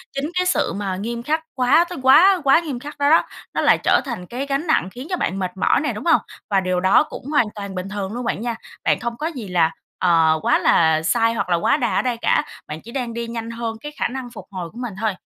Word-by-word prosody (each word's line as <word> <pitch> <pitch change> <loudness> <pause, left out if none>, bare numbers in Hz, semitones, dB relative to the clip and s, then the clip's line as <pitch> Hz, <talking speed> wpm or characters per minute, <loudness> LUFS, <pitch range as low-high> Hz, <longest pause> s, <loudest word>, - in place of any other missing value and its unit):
chính 275 +2 -2
cái 365 - +2
sự, 265 - +1
mà, 195 -2 -3
nghiêm 235 +4 -4
khắc 310 +3 0
quá 260 +7 +4
tới 355 - -6
quá 350 +8 +6
quá 275 +3 +5
nghiêm 290 -7 -5
khắc 290 +4 -9
đó 285 0 +2
đó, 325 - +5 0.3
nó - - 0
lại - - +5
trở - - +4
thành 230 -9 -5
cái 250 +8 -5
gánh 280 +4 -2
nặng 190 - +2
khiến 255 +4 -9
cho 365 - -1
bạn 195 - -2
mệt 185 -1 -2
mỏi - - +3
nè, 300 - -1
đúng - - -7
hông? 330 - +4 0.3
Và 195 -1 +3
điều 185 -1 0
đó 190 +9 +4
cũng 310 - -10
hoàn 285 -4 +2
toàn 200 -2 -6
bình 185 +1 -4
thường 205 0 -4
luôn 245 0 -4
bạn 225 - -2
nha. 235 -1 -2 0.3
Bạn - - +2
không 235 -1 -4
có 315 - -2
gì 255 -11 -6
là, 170 -3 +2 0.3
ờ, 165 -3 +3
quá - - +3
là 160 -1 +3
sai 230 +6 +2
hoặc 200 - -2
là 175 - +3
quá 170 - +2
đà - - -1
ở - - +3
đây 245 -3 -1
cả, - - +2 0.2
bạn 155 +1 -7
chỉ 235 - -11
đang 245 -3 -3
đi 235 0 -4
nhanh 230 0 -5
hơn 230 -1 -4
cái 295 - -7
khả - - +1
năng 255 -1 -6
phục 235 - -10
hồi 180 -3 -5
của 230 - -16
mình 245 -4 -5
thôi. 215 -3 0
235 Hz, 275 wpm, -21 LUFS, 190-275 Hz, 0.3 s, quá